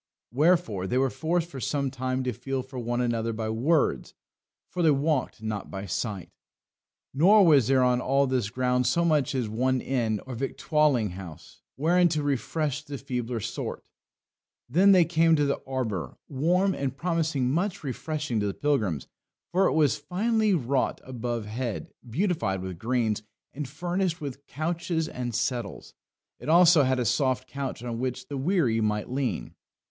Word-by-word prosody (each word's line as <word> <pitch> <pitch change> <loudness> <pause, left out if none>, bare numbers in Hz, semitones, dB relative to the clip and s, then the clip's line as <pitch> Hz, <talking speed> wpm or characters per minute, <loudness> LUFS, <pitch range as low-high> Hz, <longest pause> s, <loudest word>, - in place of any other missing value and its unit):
Wherefore 140 - +2
they 125 - 0
were 135 0 +2
forced 170 +1 -1
for 140 -6 -8
some 140 +1 -1
time 130 0 -2
to 125 -1 -1
feel 135 +3 -3
for 130 0 -8
one 120 +1 -1
another 115 -1 0
by 110 0 -3
words, 140 +8 +1 0.5
for 180 - -4
they 165 - +5
walked 140 -5 0
not 110 -2 -4
by 95 +1 -6
sight. 100 0 -4 0.8
Nor 190 +8 +6
was 145 -8 +5
there 135 -1 +4
on 125 0 +2
all 135 +2 +2
this 130 -6 0
ground 125 +1 +1
so 170 +7 +2
much 150 -5 +2
as 125 -4 0
one 130 +4 +1
inn 115 -5 -1
or 130 - -6
victualling 135 - +1
house 90 -4 -11
wherein 175 +5 +3
to 155 -2 -1
refresh 145 +1 -1
the 145 -2 -6
feebler 125 -3 -3
sort. - - -5 0.8
Then 180 +10 +5
they 180 -3 +6
came 165 0 +4
to 145 -2 +2
an - - -8
arbour, 120 -9 -3
warm, 180 +8 +2
and 135 -3 -3
promising 160 -7 0
much 175 +3 -1
refreshing 150 -2 -3
to 105 - 0
the 100 - -3
pilgrims, 110 - 0 0.4
for 190 +2 +3
it - - +1
was 150 -1 +3
finely 215 +5 +1
wrought 135 -3 0
above 120 -3 -4
head, 115 +1 -4 0.2
beautified 135 - 0
with 95 -3 -6
greens, 115 -2 0 0.3
and 145 0 -5
furnished 175 +3 -1
with 140 -2 -7
couches 160 +2 -2
and 125 -6 -4
settles. 115 - -3 0.5
It - - -6
also 170 -1 +7
had 130 -1 +2
a 125 - 0
soft 130 +2 +1
couch 135 -3 -5
on 120 -1 -4
which 130 0 -3
the 140 - -4
weary 135 - +1
might 105 -1 0
lean. 125 -7 -2
130 Hz, 165 wpm, -27 LUFS, 120-160 Hz, 0.8 s, also